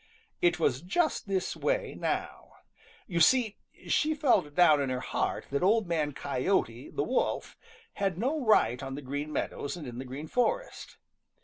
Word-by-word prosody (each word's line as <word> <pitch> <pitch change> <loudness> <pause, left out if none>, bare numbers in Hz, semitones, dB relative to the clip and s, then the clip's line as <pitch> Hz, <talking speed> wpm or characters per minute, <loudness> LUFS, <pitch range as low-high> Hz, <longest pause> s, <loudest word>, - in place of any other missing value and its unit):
It 175 -1 +3
was 130 -5 +1
just 305 - 0
this 190 -1 -1
way - - -1
now. - - -3 0.5
You 170 -4 -2
see 220 +4 +4 0.3
she 310 +1 +2
felt 245 - +2
down 155 -5 +6
in 135 - -1
her 130 0 -1
heart - - -2
that 140 - 0
Old 215 +3 +3
Man 160 -4 0
Coyote 130 -3 -1
the - - -2
Wolf 255 - -1 0.4
had 195 -4 -1
no 270 +8 -1
right 215 - +3
on 135 0 -5
the 145 - -7
Green 145 +3 -4
Meadows 145 +1 -3
and 160 - -7
in 120 -1 -7
the 130 - -5
Green 135 +4 -7
Forest. 480 - -2
170 Hz, 170 wpm, -29 LUFS, 140-230 Hz, 0.5 s, down